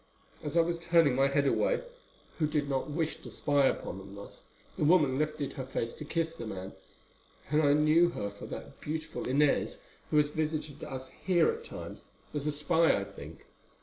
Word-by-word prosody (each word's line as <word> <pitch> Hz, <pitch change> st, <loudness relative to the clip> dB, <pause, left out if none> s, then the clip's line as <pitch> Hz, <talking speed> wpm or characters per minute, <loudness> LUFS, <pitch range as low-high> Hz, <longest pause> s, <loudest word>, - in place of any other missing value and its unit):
As 150 Hz, +2 st, -2 dB
I -, -, +8 dB
was 170 Hz, 0 st, -1 dB
turning 165 Hz, -5 st, +4 dB
my 135 Hz, +1 st, +4 dB
head 140 Hz, +1 st, +2 dB
away -, -, +2 dB, 0.6 s
who 155 Hz, -, +3 dB
did 150 Hz, -1 st, 0 dB
not 135 Hz, +1 st, -1 dB
wish 160 Hz, +1 st, -2 dB
to -, -, -9 dB
spy 145 Hz, -2 st, +2 dB
upon 95 Hz, -, -2 dB
them 95 Hz, +1 st, -11 dB
thus, 100 Hz, 0 st, -10 dB, 0.3 s
the -, -, -1 dB
woman 150 Hz, -5 st, +4 dB
lifted 150 Hz, -2 st, -1 dB
her 135 Hz, -, -4 dB
face 115 Hz, -3 st, -2 dB
to 150 Hz, -, -8 dB
kiss 165 Hz, +1 st, -1 dB
the 115 Hz, -, -7 dB
man, 95 Hz, -2 st, -6 dB, 0.8 s
and 150 Hz, +1 st, +4 dB
I 145 Hz, -2 st, +5 dB
knew 155 Hz, +3 st, +5 dB
her 100 Hz, -11 st, -4 dB
for 100 Hz, -, -9 dB
that -, -, -8 dB
beautiful 155 Hz, +1 st, -4 dB
Inez 140 Hz, +2 st, +2 dB, 0.3 s
who 150 Hz, -, +2 dB
has 150 Hz, -1 st, +4 dB
visited 155 Hz, -1 st, -3 dB
us 130 Hz, -1 st, -6 dB
here 180 Hz, -, +2 dB
at 460 Hz, +1 st, -7 dB
times, -, -, -8 dB, 0.3 s
as 150 Hz, 0 st, -2 dB
a -, -, +2 dB
spy 160 Hz, -, +3 dB
I -, -, -3 dB
think. 80 Hz, -6 st, -11 dB
150 Hz, 195 wpm, -31 LUFS, 135-160 Hz, 0.8 s, I